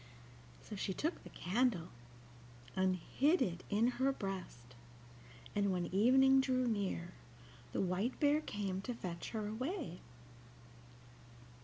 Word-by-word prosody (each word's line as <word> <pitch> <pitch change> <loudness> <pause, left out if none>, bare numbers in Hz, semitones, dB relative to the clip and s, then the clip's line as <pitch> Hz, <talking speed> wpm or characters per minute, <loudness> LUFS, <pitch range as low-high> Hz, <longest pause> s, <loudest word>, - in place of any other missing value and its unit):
So 215 - -7
she 190 -1 -2
took 320 +3 -1
the - - -10
candle, 195 -3 0 0.9
and 185 0 +3
hid 290 - +2
it 175 -1 -1
in 210 +2 +3 0.2
her 270 +1 +4
breast, 185 - -6 0.8
and 200 -1 +2
when 180 -2 0
evening 265 +6 +6
drew 255 -1 +1
near 195 -5 -1 0.6
the - - 0
White 190 +7 -1
Bear 295 +1 +4
came 195 -7 -3
to 245 +4 -4
fetch 175 -6 -5
her 215 -2 -3
away. 255 - -3
205 Hz, 125 wpm, -36 LUFS, 185-260 Hz, 0.9 s, evening